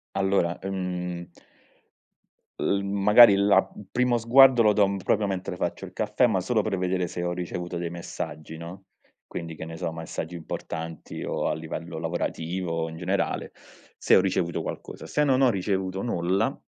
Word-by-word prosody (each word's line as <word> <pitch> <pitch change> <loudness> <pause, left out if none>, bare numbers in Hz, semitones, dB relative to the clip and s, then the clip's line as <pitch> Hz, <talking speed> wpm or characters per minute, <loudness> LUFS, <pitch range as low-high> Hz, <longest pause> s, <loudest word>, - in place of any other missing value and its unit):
Allora, 95 -3 +1
mhmm 90 -2 -4 1.3
l 100 0 +1
magari 100 +2 +7
la 100 -1 +4
il 100 - -11
primo 125 -1 +2
sguardo 125 +1 +7
lo 105 -1 +5
do 100 -1 +3
proprio 105 -1 +2
mentre 95 -2 -3
faccio 90 +2 -3
il 90 - -12
caffè, 110 +3 +2
ma 105 -5 +1
solo 110 +4 +1
per 100 -2 -2
vedere 90 0 0
se 85 +1 -5
ho 90 - -1
ricevuto 90 0 -4
dei 85 0 -3
messaggi, 80 -2 -7
no? 85 +4 -9 0.4
Quindi, 80 -1 -6
che 80 - -7
ne 80 0 -8
so, 80 - -3
messaggi 80 +1 -6
importanti, 80 -1 -6
o - - -2
a - - 0
livello 80 +1 -6
lavorativo 85 0 -2
in 80 - -9
generale, 95 +3 -1 0.5
se - - +4
ho - - +6
ricevuto 90 -2 -1
qualcosa. - - -7
Se 150 - +1
non 135 -2 +3
ho 130 - +6
ricevuto 95 -1 -1
nulla, 100 +4 0
95 Hz, 165 wpm, -26 LUFS, 85-100 Hz, 1.3 s, magari